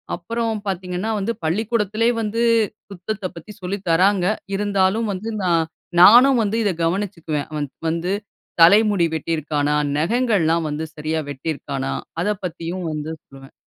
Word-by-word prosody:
அப்புறம் 225 +5 -2
பார்த்தீங்கன்னா 185 +2 -2
வந்து, 205 +4 -1
பள்ளிக்கூடத்திலயே 215 +5 +1
வந்து 225 +2 -2 0.5
சுத்தத்த 195 +1 -5
பத்தி 170 +5 -10
சொல்லி 185 +2 -3
தர்றாங்க. 185 +2 +3 0.3
இருந்தாலும் 205 +2 +1
வந்து 205 +4 -5
நான் 165 -2 +2 0.4
நானும் 245 +7 +8
வந்து 215 +2 -1
இத 205 - +2
கவனிச்சுக்குவேன். 165 -4 -2
அவன் 150 -2 -3 0.2
வந்து 170 +3 -2 0.5
தலைமுடி 200 +1 +6
வெட்டியிருக்கானா, 150 -2 -1 0.2
நகங்கள்லாம் 170 -3 +1
வந்து 150 +2 -3
சரியா 155 +1 -2
வெட்டியிருக்கானா, 140 -1 -4 0.3
அத 180 - -1 0.2
பத்தியும் 175 +1 -4
வந்து 150 0 -4
சொல்லுவேன். 135 0 -15
180 Hz, 125 wpm, -21 LUFS, 160-210 Hz, 0.5 s, நானும்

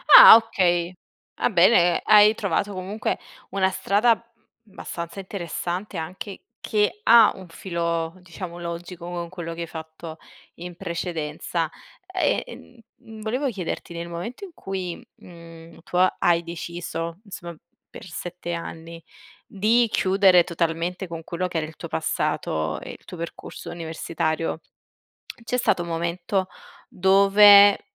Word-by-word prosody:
Ah - - +12
okay, 180 -6 +1 0.4
va - - +1
bene, 175 -2 +4
hai 210 0 +7
trovato 200 -1 -1
comunque 195 +3 -3 0.3
una 190 -1 +1
strada, 200 +5 +2
mhmm, 230 -2 -27
abbastanza 170 +1 -7
interessante 185 0 -5
anche 185 +5 -7 0.2
che 215 - 0
ha 230 - +7
un 190 -1 -11
filo 170 -2 -3
diciamo 180 0 -8
logico 170 0 -7
con 175 -1 -5
quello 170 -2 -6
che 170 - -7
hai 170 - -4
fatto 160 0 -9 0.4
in 175 +1 -9
precedenza. 165 -1 -3 0.4
E, - - +1 0.6
mhmm, 220 -1 -12
volevo 250 +6 -1
chiederti, 180 -5 -5
nel 170 0 -6
momento 175 - -7
in 375 - -13
cui, 185 -3 -5
mhmm, 165 -1 -14
tu 180 - -4
ha 185 +1 +4
hai 170 -1 +3
deciso, 170 0 -6
insomma 175 -4 -8 0.3
per - - -11
7 175 0 -6
anni, 165 0 -8 0.4
di 225 +4 +2
chiudere 190 -2 +4
totalmente 170 +2 -2
con 165 -1 -7
quello 175 +2 -3
che 175 - -4
era 155 - -1
il 160 - -13
tuo - - -8
passato 80 0 -2
e - - -9
il - - -29
tuo 180 - -9
percorso 170 0 -8
universitario, 165 -1 -3 0.9
c'è 250 - -1
stato 235 -7 +1
un 170 - -7
momento 170 +3 -2 0.4
dove 200 +2 +7
175 Hz, 135 wpm, -24 LUFS, 170-195 Hz, 0.9 s, Ah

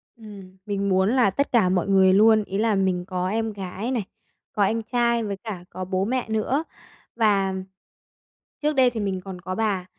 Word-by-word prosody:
Ừm, 200 -4 -12
mình 200 -1 -2
muốn 190 +2 +3
là 250 -5 +4
tất 280 +8 -1
cả 220 -7 +4
mọi 180 0 0
người 190 -1 +5
luôn. 215 +2 +5
Ý 195 - -5
là 220 0 +2
mình 185 -2 0
có 185 -1 -2
em 225 +1 -2
gái 195 +4 -5
này, 235 -6 -1 0.5
có 205 - +1
anh 225 +3 +1
trai, 235 0 +1
với 200 -2 -4
cả 200 -6 -6
có 185 +1 -6
bố 185 +1 -1
mẹ 250 0 -2
nữa 220 +7 0 0.5
và 200 -4 +2 1.1
trước 300 0 +1
đây 255 -2 +5
thì 230 -2 -5
mình 190 -2 -2
còn 185 -2 -9
có 185 +2 -4
bà. 205 -5 -1
200 Hz, 200 wpm, -24 LUFS, 190-225 Hz, 1.1 s, người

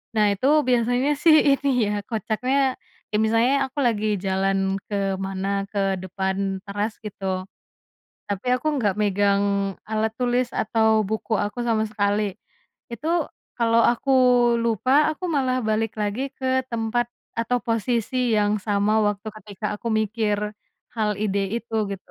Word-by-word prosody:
Nah, 210 -1 +4
itu 195 - -22 0.2
biasanya 245 +2 +2
sih 320 -2 +7 0.2
ini 280 0 -2 0.2
ya, - - -1
kocaknya 255 +5 0 0.3
kayak 210 0 0
misalnya 230 +4 +3
aku 265 +2 -7
lagi 215 -2 0 0.2
jalan 195 0 +1
kemana, 195 -1 -2 0.2
ke 205 - -2 0.2
depan 190 +1 -2 0.3
teras, 205 +2 -2
gitu. 205 -1 -8 1.1
Tapi 200 +4 -3
aku 255 +4 -4
nggak 205 -6 +1
megang 200 0 +2 0.5
alat 220 0 0
tulis 245 0 +1
atau 220 0 +2
buku 220 +1 -3
aku 205 +4 -6
sama 225 -2 +2
sekali. 205 0 +1 0.7
Itu 245 +7 -4 0.5
kalau 230 -1 +3
aku 245 +3 -2 0.5
lupa, 230 +2 +1 0.2
aku 310 +4 -6
malah 260 -3 +1
balik 220 0 0
lagi 205 +5 -2 0.2
ke 260 - -3 0.2
tempat 235 +1 0 0.3
atau 230 +2 +1
posisi 230 +1 -1 0.2
yang 205 0 +2
sama 205 0 +2
waktu 205 +1 -2
ketika 210 0 -6
aku 220 +3 -5
mikir 215 -1 0 0.6
hal 215 -2 0
ide 200 -1 0 0.2
itu, 230 -1 -10 0.2
gitu. 195 -1 -8
220 Hz, 135 wpm, -23 LUFS, 205-240 Hz, 1.1 s, sih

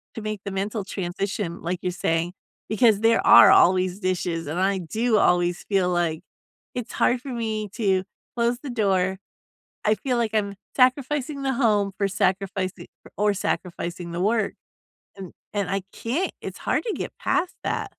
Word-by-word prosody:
to 225 - -5
make 215 -2 -4
the 200 - -3
mental 200 +2 -2
transition 190 -1 -4
like, 175 +1 -2
you're 180 - -1
saying, 170 0 -1 0.4
because 215 -1 +4
there 225 0 +3
are - - +9
always 185 +1 +4
dishes, 180 -3 -2
and 160 +5 -3
I 195 +1 +2
do 220 +7 0
always 175 -1 +2
feel 190 -3 +1
like 170 -3 0 0.5
it's 245 -2 -4
hard 245 0 +2
for 275 - -8
me 220 -3 -3
to 190 -4 +1 0.3
close 240 +1 +1
the 285 - -7
door. 190 -4 +1 0.7
I 215 +1 +4
feel 250 0 -1
like 230 -2 0
I'm 200 -2 0 0.2
sacrificing 275 +2 +1
the 265 0 +1
home 210 -5 +2
for 200 - +1
sacrifici 190 -1 -1 0.3
or 205 0 +2
sacrificing 175 -2 -3
the 175 +1 -3
work, 215 +1 +1 0.6
and 190 -3 -9 0.2
and 200 -3 -1
I 195 0 0
can't, 285 +12 -2
it's - - -7
hard - - 0
to 445 - -1
get - - -4
past 355 - 0
that. - - -2
200 Hz, 165 wpm, -24 LUFS, 180-230 Hz, 0.7 s, are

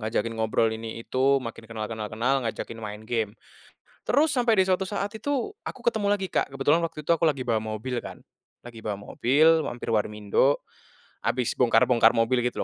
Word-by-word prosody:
ngajakin 115 +1 -1
ngobrol 110 0 +2
ini 115 +1 -6
itu 135 +2 +2
makin 115 -1 -7
kenal 110 -1 -5
kenal 110 -1 -4
kenal 125 +4 0
ngajakin 115 0 -5
main 105 -1 -7
game, 110 -2 -2 0.7
terus 305 +2 +3
sampai 240 -2 +3
di - - +5
suatu 185 +1 +2
saat 200 +1 -2
itu 280 - -1 0.2
aku - - -6
ketemu 210 -3 +1
lagi 190 -3 -2
Kak - - +1
kebetulan 135 +3 +3
waktu 160 -2 -6
itu 150 - -18
aku 170 0 +3
lagi 145 -4 +1
bawa 120 -3 +1
mobil 110 +3 -4
kan, - - -9 0.4
lagi 115 -2 -12
bawa 105 - -1
mobil 155 +9 +3
mampir 120 -1 -5
warmindo, 105 +5 +1 0.6
habis 125 -2 0
bongkar-bongkar 120 -1 +4
mobil 120 +2 +2
gitu 125 0 -2
120 Hz, 180 wpm, -26 LUFS, 110-155 Hz, 0.7 s, di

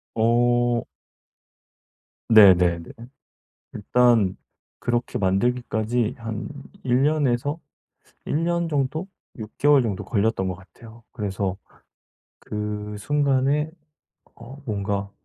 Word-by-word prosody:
어. 120 +1 +2 1.4
네네네. 90 -6 +6 0.8
일단 115 -3 +2 0.4
그렇게 120 0 -1
만들기까지 115 +3 0
한 115 -3 -5 0.4
1 125 0 +2
년에서 145 0 +1 0.7
1 150 +3 0
년 170 0 0
정도, 150 +4 -1 0.3
6 110 -1 -7
개월 145 -1 +5
정도 105 -6 -3
걸렸던 110 -3 0
것 90 - -3
같아요. 110 +6 -16
그래서 100 -4 -3 0.8
그 105 0 -5
순간에 145 +4 +1 0.6
어 120 +4 -12
뭔가 100 -2 -2
115 Hz, 165 characters per minute, -23 LUFS, 105-130 Hz, 1.4 s, 네네네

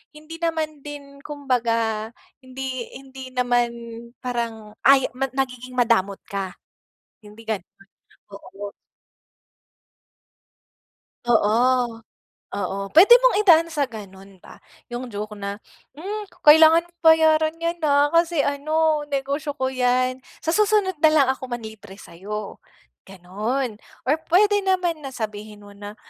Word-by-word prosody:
hindi 310 +2 -11
naman 320 -3 -2
din 280 -1 -10
kumbaga 230 -6 -1 0.3
hindi 260 -1 -6
hindi 265 -1 -10
naman 245 -1 +2 0.6
parang 230 -4 -4
ay, 270 -1 +6 0.3
nagiging 255 -2 -3
madamot 225 -5 +1
ka, 195 -2 -5 0.7
hindi 210 +2 -14
gano'n, 205 -5 -4 0.6
oo. 200 0 -9 2.5
Oo, 240 +1 +2 0.6
oo 200 -1 -3 0.2
puwede 385 +9 +8
mong - - +3
idaan 335 -5 +5
sa 290 -4 0
gano'n 195 -4 -12
ba - - -14 0.3
yung 245 +1 -5
joke 210 -1 -6
na, 200 -1 -5 0.4
"hmm 410 +6 -6 0.2
kailangan 320 +2 +7 0.2
bayaran 315 -1 +4
yan, 335 +1 -3
ha, 290 -1 +2
kasi 335 -3 +2
ano 305 +1 0
negosyo 280 +1 -3
ko 260 -1 -2
yan, 255 0 +1 0.2
sa 325 - 0
susunod 410 -4 +1
na 315 - +6
lang 305 -3 +4
ako 260 -1 -9
manlibre 220 -5 -8
sayo," 200 +3 -8 0.5
ganon. 210 +6 -4 0.2
Or 295 +5 +1
puwede 410 +4 +4
naman 365 -4 0
na 270 -3 -8
sabihin 210 -1 -7
mo 205 - -13
na, 205 +1 -10
260 Hz, 115 wpm, -22 LUFS, 220-315 Hz, 2.5 s, puwede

